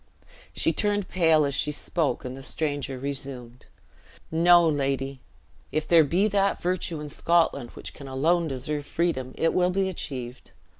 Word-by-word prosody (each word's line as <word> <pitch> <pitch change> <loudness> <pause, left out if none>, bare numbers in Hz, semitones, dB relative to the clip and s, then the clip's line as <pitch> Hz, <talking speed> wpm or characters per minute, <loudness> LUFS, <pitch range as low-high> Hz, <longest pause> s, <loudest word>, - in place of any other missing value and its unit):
She 165 - +1
turned 205 +2 0
pale 160 -4 +4
as 140 - -2
she 145 +2 0
spoke, 150 -1 -1
and 125 0 -5
the 135 - -9
stranger 145 -2 -3
resumed. 130 -3 -6 0.6
"No, 170 +1 +6
lady, 135 -2 -1 0.5
if 155 +1 -1
there 165 0 +6
be 180 +8 +2
that 200 -1 +1
virtue 175 -2 -2
in 150 0 -6
Scotland 165 -8 +1
which - - -8
can 140 - -10
alone 160 +6 +1
deserve 145 +2 -3
freedom, 130 -7 -1
it 165 - +2
will 180 0 +3
be 190 +1 0
achieved. 130 -8 -6
150 Hz, 155 wpm, -26 LUFS, 135-175 Hz, 0.6 s, No